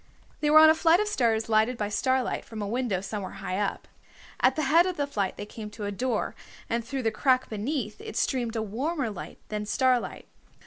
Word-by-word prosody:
They 300 - +1
were 305 - +7
on 315 0 +9
a - - +5
flight 325 +2 +4
of 425 - 0
stairs 230 - +1
lighted 220 +2 +2
by 210 -2 -2
starlight 260 +4 0
from 225 - -9
a 205 - -3
window 230 -4 -1
somewhere 195 -1 -5
high 195 -1 -4
up. 205 -1 -2 0.5
At 260 - +4
the 310 - -1
head 330 +6 +5
of 365 - -3
the 285 - +1
flight 205 -9 -2
they 205 - -5
came 210 0 -8
to 210 0 -7
a 205 - -2
door, 240 +2 -1 0.3
and 235 0 -1
through 265 +2 -4
the 225 - +1
crack 255 +2 +2
beneath 255 - -3
it 440 0 -7
streamed 240 -4 0
a 220 - -1
warmer 255 +4 -2
light 200 - -8
than 210 0 -3
starlight. 255 +1 +1
235 Hz, 220 wpm, -27 LUFS, 210-280 Hz, 0.5 s, on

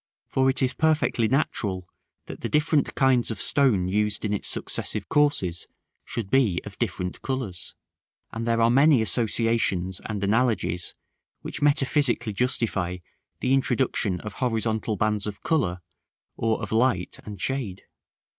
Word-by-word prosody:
For 130 0 +2
it 130 0 +1
is 130 - +1
perfectly 155 -7 +2
natural 105 - -1 0.4
that - - -9
the - - -3
different 150 -1 +1
kinds 130 -3 +3
of 110 -4 -4
stone 120 -11 +3
used 105 +2 0
in 105 - 0
its 105 - -3
successive 105 -2 -2
courses 145 - +1 0.4
should 110 -5 -5
be 115 -10 +3
of 105 -2 -10
different 90 -5 -3
colors; 130 -10 -4 0.6
and 115 +1 -4
there 115 0 +2
are 115 - +4
many 135 -1 +5
associations 110 -6 0
and 105 -2 -3
analogies 100 -6 0 0.5
which - - -5
metaphysically 135 -5 +2
justify 100 -6 0 0.4
the 130 - +2
introduction 125 -7 +1
of 105 -2 -7
horizontal 110 -2 0
bands 105 -1 0
of 105 -1 -7
color, 95 - 0 0.5
or 110 -1 0
of - - -5
light 110 -5 +1
and 105 -3 -8
shade. 115 -6 -3
115 Hz, 140 wpm, -25 LUFS, 100-130 Hz, 0.6 s, many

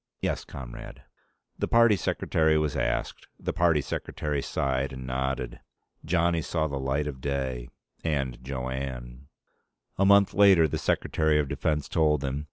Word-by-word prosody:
"Yes, - - -2
comrade." 60 -3 -9 0.6
The - - 0
party 115 -2 +5
secretary 80 -3 +1
was 75 -3 0
asked. 65 -1 -2
The - - -3
party 85 -3 +3
secretary 75 +1 -3
sighed 65 0 -1
and 65 -1 -7
nodded. 65 -1 -3 0.4
Johnny 85 0 +1
saw 80 0 -1
the 70 -2 -4
light 65 +2 -1
of 70 -3 -6
day. 65 -3 -3 0.3
And 70 -6 -2
Jo 65 -1 -4
Anne. 65 -1 -6 0.7
A 100 - +4
month 100 0 +5
later, 95 -5 +6
the - - -3
Secretary 80 -1 +1
of 75 -2 +1
Defense 75 +2 -1
told 75 -3 +2
him. 70 +1 -2
70 Hz, 150 wpm, -27 LUFS, 65-80 Hz, 0.7 s, later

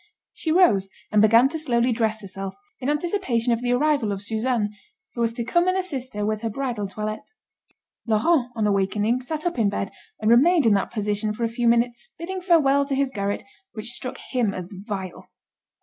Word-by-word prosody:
She 320 - -3
rose 220 - +4 0.2
and 210 0 +4
began 230 +4 +6
to 320 +2 -4
slowly 245 -4 +1
dress 220 -2 0
herself, 195 -1 -6 0.2
in 260 - -2
anticipation 295 - 0
of 230 - -2
the 245 0 +1
arrival 280 -4 +2
of 200 0 -4
Suzanne, 220 0 -1 0.4
who 235 - -4
was 230 -1 +2
to 235 - -3
come 345 +10 +2
and 370 +1 +2
assist 275 - -4
her 210 0 -1
with 215 0 -1
her 225 - -1
bridal 235 -3 -3
toilet. 215 +2 -4 0.9
Laurent, 245 +5 +2
on 220 -2 0
awakening, 210 +4 +1
sat 310 +5 -5
up 345 -7 -1
in 210 -3 +3
bed, 195 -1 -3 0.3
and 215 +1 +2
remained 305 +5 +5
in 220 - +5
that 195 - +1
position 210 -1 -1
for 235 - -4
a - - +3
few 235 +1 -1
minutes, 235 - +1
bidding 370 +3 -5
farewell 295 -6 +4
to 275 -1 -1
his 275 -1 0
garret, 200 -2 -2 0.3
which 220 +1 0
struck 250 +1 -1
him 235 -6 +1
as 180 -1 -7
vile. 195 -2 -6
235 Hz, 195 wpm, -24 LUFS, 210-275 Hz, 0.9 s, began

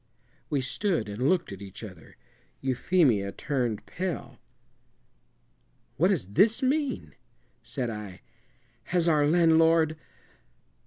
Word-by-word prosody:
We 145 -3 0
stood 165 - -1
and 115 +7 -1
looked 175 - +1
at 100 0 -8
each 100 +2 -10
other. 90 -7 -12 0.4
Euphemia 130 - +2
turned 120 -4 -2
pale. 185 -3 -5 1.6
"What 175 - +4
does 180 - 0
this 215 - +3
mean?" 280 +1 -1 0.5
said 125 -4 -4
I. 105 -4 -8 0.6
"Has 175 -1 +1
our 150 -3 +4
landlord 165 -1 +4
150 Hz, 105 wpm, -27 LUFS, 110-175 Hz, 1.6 s, What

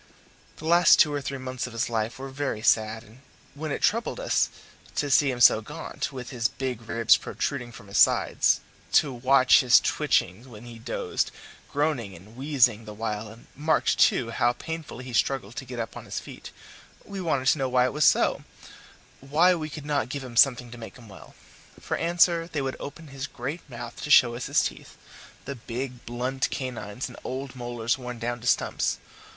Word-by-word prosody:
The 155 - -10
last 170 +2 +6
two 150 -2 +5
or 145 - -2
three 135 0 -4
months 130 -1 -4
of 125 - -10
his 115 - -1
life 115 0 -2
were 135 +1 -7
very 130 -5 -3
sad, 110 0 +2
and 115 +3 -18 0.3
when 155 +1 -5
it - - -3
troubled 230 - +1
us - - +1 0.5
to 145 -1 -1
see 145 0 +5
him 125 -2 -3
so 110 -2 +7
gaunt, 150 +8 -6
with 125 -2 -7
his 120 -3 0
big 130 -4 -4
ribs 115 -1 +4
protruding 125 -4 -4
from 115 -3 -13
his 100 - -1
sides, - - +4 0.3
to 140 -3 +4
watch 130 +1 +5
his 125 -2 +6
twitchings 100 +9 0
when 115 -2 -12
he 115 -1 -10
dozed, 115 - -2 0.4
groaning 140 -9 -1
and 100 +7 -15
wheezing 125 -5 +2
the 105 0 -9
while, 105 0 -3
and 115 +2 -14
marked, 155 +3 +1
too, 115 -2 +3
how 120 0 +2
painfully 160 -3 -7
he 125 - -8
struggled 120 -2 0
to 135 - -5
get 125 0 -8
up 115 - -4
on - - -9
his - - -4
feet, - - -10 0.6
we 200 -1 -6
wanted 140 -7 0
to 150 - +2
know 135 -1 0
why 125 0 +3
it 130 - -1
was 150 +1 +1
so - - +3 0.8
why 155 +7 +3
we 155 -3 -4
could 150 -1 -8
not 145 -5 -1
give 140 0 -4
him 125 -2 -9
something 125 -1 +4
to 120 - -10
make 115 - -10
him 115 -4 -15
well? 100 - -14 0.4
For - - -3
answer 170 0 +2
they 150 -5 -3
would 135 -1 -3
open 155 +2 -9
his 135 +1 -6
great 140 +8 -5
mouth 120 -1 -8
to - - -5
show 125 -5 +6
us 120 +1 -5
his - - +3
teeth - - -6 0.5
the 140 - -4
big 125 0 -6
blunt 125 +3 -2
canines 125 -3 -5
and 125 - -11
old 130 0 -5
molars 120 0 -2
worn 125 -1 -6
down 120 +1 -3
to 120 - -6
stumps. - - +1
125 Hz, 200 wpm, -26 LUFS, 120-145 Hz, 0.8 s, so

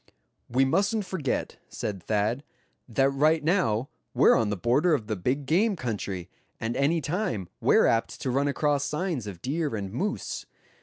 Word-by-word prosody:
"We 130 +3 +3
mustn't 200 +8 +1
forget," 175 -8 -2
said 100 -3 -4
Thad, 110 - 0 0.5
"that 135 +4 +3
right 155 +3 +3
now 145 - +1 0.3
we're - - +6
on 115 -4 +2
the 105 - -1
border 140 - +3
of 115 - -4
the 110 0 -2
big 130 +9 -1
game 195 +9 +2
country, 100 - -4 0.3
and 115 +1 -2
any 155 +4 +2
time 140 - -2
we're - - +4
apt 115 0 +1
to 130 - -1
run 140 +3 +1
across 145 0 +1
signs 150 - -2
of 90 -4 -8
deer 145 -1 -1
and 100 -2 -5
moose. 200 - -3
135 Hz, 165 wpm, -27 LUFS, 110-160 Hz, 0.5 s, we're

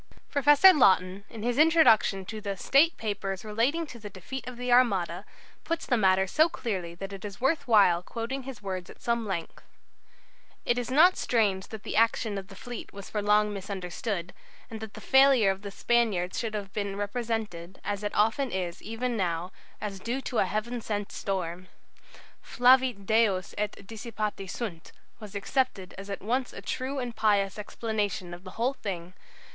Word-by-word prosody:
Professor 290 +6 +7
Laughton, 190 - +3
in 220 -2 -8
his 245 +3 0
introduction 250 - +5
to 215 +2 -6
the 200 -2 -4
"State 305 - +4
Papers 200 -3 -3
relating 240 +10 0
to 245 -6 -11
the 210 -1 -8
Defeat 200 +9 -7
of 250 -1 -7
the 250 0 -2
Armada," 215 -8 +2 0.4
puts 330 0 -2
the 250 - +2
matter 190 -3 +3
so 310 - +3
clearly 185 - -4
that 195 +3 -7
it 195 - -8
is 205 0 -7
worth 270 +4 +1
while 195 -7 +5
quoting 235 +7 -4
his 260 -5 -9
words 185 -2 -4
at - - -13
some 235 -2 -1
length: 170 -4 -4 1.0
"It 240 +1 +2
is 245 - -4
not 320 +8 +6
strange 205 -5 +1
that 220 -2 -9
the - - -4
action 225 -2 +2
of 190 - -10
the 195 - -13
fleet 240 +4 -8
was 200 -1 -10
for 210 - -1
long 210 0 +3
misunderstood, 190 -1 -4 0.4
and 220 - -6
that 220 -1 -8
the - - -9
failure 265 -6 +5
of 190 0 -6
the 205 - -6
Spaniards 200 -4 +1
should 225 -2 -3
have 200 -2 -5
been 200 -2 -2
represented 205 -4 -4
as 205 -1 -3
it 205 - -3
often 225 +6 +2
is 180 -4 -4
even 235 +3 -3
now 175 -3 -1 0.3
as 200 -2 -5
due 235 +7 -2
to 250 - -2
a - - +4
Heaven 235 +3 -3
sent 205 -2 -3
storm. 185 -2 -3 0.7
'Flavit 250 -4 +3
Deus 210 -4 +2
et 210 0 -2
dissipati 215 -2 -5
sunt' 180 -9 -6 0.3
was 210 -3 -10
accepted 200 -3 -1
as 200 +1 -9
at 195 - -5
once 250 +4 -1
a - - -8
true 265 +2 -3
and 245 -3 -4
pious 205 -2 +2
explanation 210 -4 -3
of 175 +1 -10
the 185 - -9
whole 245 +4 +1
thing. 180 -7 -6
210 Hz, 180 wpm, -28 LUFS, 195-245 Hz, 1.0 s, Professor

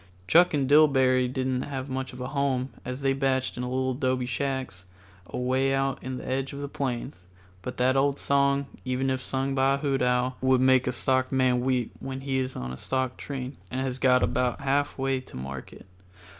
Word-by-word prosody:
Chuck 175 - +6
and 135 -2 +1
Dillbery 130 -4 +5
didn't 130 -1 -1
have 135 -1 -4
much 130 0 -4
of 125 - -11
a 125 +1 -4
home, 135 -2 0
as 125 +2 -5
they 135 0 +3
batched 135 -1 0
in 125 - -4
little 130 +1 -1
dobe 130 -1 0
shacks 130 -7 -3 0.4
away 130 +2 0
out 135 0 -1
on 130 0 -4
the - - -8
edge 135 +1 -2
of 140 - -6
the 140 - -4
plains; 120 -9 -4 0.4
but 125 - -6
that 130 +1 +3
old 140 +1 +2
song, 140 0 +2 0.2
even 130 +1 0
if 130 -1 -1
sung 135 +1 -2
by 135 0 +3
a - - -3
hoot 140 -2 0
owl, 125 +1 +1
would 130 0 +4
make 130 0 +4
a - - +2
stockman 130 0 +2
weep 125 -2 0
when 135 0 -5
he 135 -1 -1
is 130 0 -3
on 65 0 -5
a - - -7
stock 130 - -1
train 135 -1 -6
and 130 +1 -2
has 130 -1 -3
got 125 -1 +4
about 125 -1 0
half 140 +1 0
way 135 0 0
to 130 - -11
market. 65 0 -8
130 Hz, 200 wpm, -27 LUFS, 125-135 Hz, 0.4 s, Chuck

